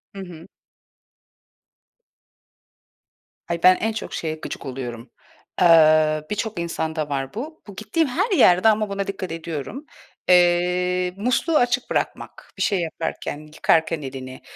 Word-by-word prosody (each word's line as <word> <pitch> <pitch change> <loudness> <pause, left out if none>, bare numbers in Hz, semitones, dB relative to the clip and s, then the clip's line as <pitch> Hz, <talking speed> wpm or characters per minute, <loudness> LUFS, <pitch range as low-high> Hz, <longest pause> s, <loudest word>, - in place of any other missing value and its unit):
Hı 195 - -6
hı. 175 -3 -11 3.0
Hayır, 170 -1 -4
ben 185 0 +8
en 220 +3 -1
çok 220 - -6
şeye 160 -1 -3
gıcık 155 - -8
oluyorum. 125 -2 -6 0.5
Eee, 155 -2 +5
birçok 210 -2 -3
insanda 160 -2 -3
var 135 -1 -3
bu. 295 +9 -7
Bu 200 - -10
gittiğim 310 - 0
her 385 - -1
yerde 205 - +5
ama 215 -1 +1
buna 200 0 -3
dikkat 190 -3 -5
ediyorum. 165 - -6 0.4
Eee, 180 +1 +3
musluğu 250 +8 +1
açık 245 0 +1
bırakmak, - - -4
bir - - -5
şey 195 -4 +1
yaparken, 160 -2 -4 0.2
yıkarken 160 -1 +2
elini. 130 -1 -8
180 Hz, 130 wpm, -22 LUFS, 155-210 Hz, 3.0 s, ben